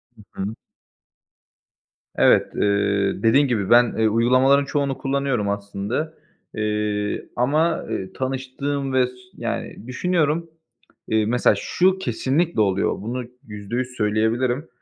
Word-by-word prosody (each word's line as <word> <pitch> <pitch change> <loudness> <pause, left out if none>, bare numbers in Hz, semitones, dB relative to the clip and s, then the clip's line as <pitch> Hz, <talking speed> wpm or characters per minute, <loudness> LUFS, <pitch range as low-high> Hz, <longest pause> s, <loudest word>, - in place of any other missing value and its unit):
Hı 105 -3 -11
hı. 105 +3 -4 1.6
Evet, - - +4
eee, 100 -1 +1
dediğin 135 +6 +5
gibi 110 -6 -1
ben, 120 0 +5
eee, 110 0 +3
uygulamaların 130 +5 +4
çoğunu 140 -1 -1
kullanıyorum 135 -6 -1
aslında. 100 +9 -3 0.4
Eee, 105 -1 -2
ama, 155 +7 +1
eee, 95 0 -4
tanıştığım 135 +1 -3
ve 130 -1 +3
s 125 - -12 0.2
yani 115 - -5
düşünüyorum, 165 +3 0 0.6
eee, 110 -1 +2
mesela 120 +3 +3
şu 185 +1 +2
kesinlikle 140 -1 0
oluyor. 95 -2 +1
Bunu 120 +4 -4 0.2
%100 110 +4 -4
söyleyebilirim. 115 +6 0
120 Hz, 115 wpm, -22 LUFS, 105-140 Hz, 1.6 s, dediğin